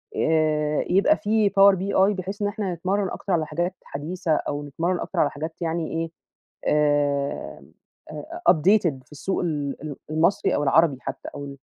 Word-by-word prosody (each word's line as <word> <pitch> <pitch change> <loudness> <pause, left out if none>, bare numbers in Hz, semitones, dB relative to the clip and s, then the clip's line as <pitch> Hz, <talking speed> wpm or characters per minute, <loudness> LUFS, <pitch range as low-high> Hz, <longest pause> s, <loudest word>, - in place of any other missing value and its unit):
آآ، 155 -1 +1
يبقى 200 - +4
فيه 210 -1 +2
power 195 0 +6
BI 195 +2 +2
بحيث 195 +3 -5
إن 205 - +2
إحنا 205 -3 -3
نتمرن 190 +3 -1
أكتر 195 - -4
على 160 -2 +1
حاجات 175 +5 -2
حديثة 160 +4 -4
أو 145 0 -3
نتمرن 165 +5 -2
أكتر - - -3
على 145 - +4
حاجات 160 +4 -7
يعني 165 -1 -1
إيه 165 0 -3 0.6
آآ، 145 -1 0 0.5
أ - - -9 0.4
أ - - +9
updated 170 -5 +2
في - - -32
السوق 190 +6 -3
ال 145 -5 -3
ال 150 -2 -6
المصري 160 +6 +2
أو 145 - 0
العربي 145 0 +4
حتّى، - - -6
أو 145 0 -6
ال 140 0 -9
165 Hz, 175 wpm, -24 LUFS, 150-190 Hz, 0.6 s, أ